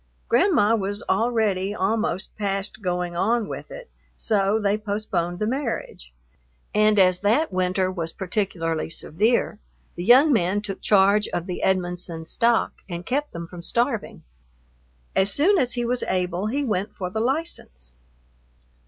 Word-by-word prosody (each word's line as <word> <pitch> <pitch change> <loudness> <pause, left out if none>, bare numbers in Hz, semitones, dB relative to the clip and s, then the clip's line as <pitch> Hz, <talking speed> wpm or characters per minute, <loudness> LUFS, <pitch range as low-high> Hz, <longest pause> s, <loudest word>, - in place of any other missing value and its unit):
Grandma 230 - +3
was 205 -1 -3
already 205 -2 +1
almost 195 -2 -1
past 200 +1 -2
going 180 -2 -2
on 220 +4 +1
with - - -7
it, - - -9 0.3
so 205 0 +1
they 205 -1 +1
postponed 200 -5 -2
the 215 - -1
marriage, 230 - -4 0.6
and 215 0 +3
as 185 -2 +4
that 225 +7 +2
winter 185 0 +1
was 165 -3 -4
particularly 175 -5 -2
severe, 210 +7 0 0.3
the 175 - -6
young 265 - +6
man 190 -2 +1
took 205 -2 -6
charge 205 +1 +4
of 175 - -3
the 180 -2 -5
Edmonson 175 -3 -1
stock 230 +7 +1
and 175 0 -5
kept 290 +3 -1
them 170 0 -6
from 175 +1 -10
starving. 235 +4 -2 0.9
As 195 +1 +4
soon 365 - +4
as 250 -2 +1
he 240 -1 -2
was 245 +1 0
able 180 +2 -1
he 280 +6 -1
went 210 -3 -2
for 180 -2 -4
the 220 - -2
license. 230 - -3
205 Hz, 145 wpm, -24 LUFS, 180-230 Hz, 0.9 s, young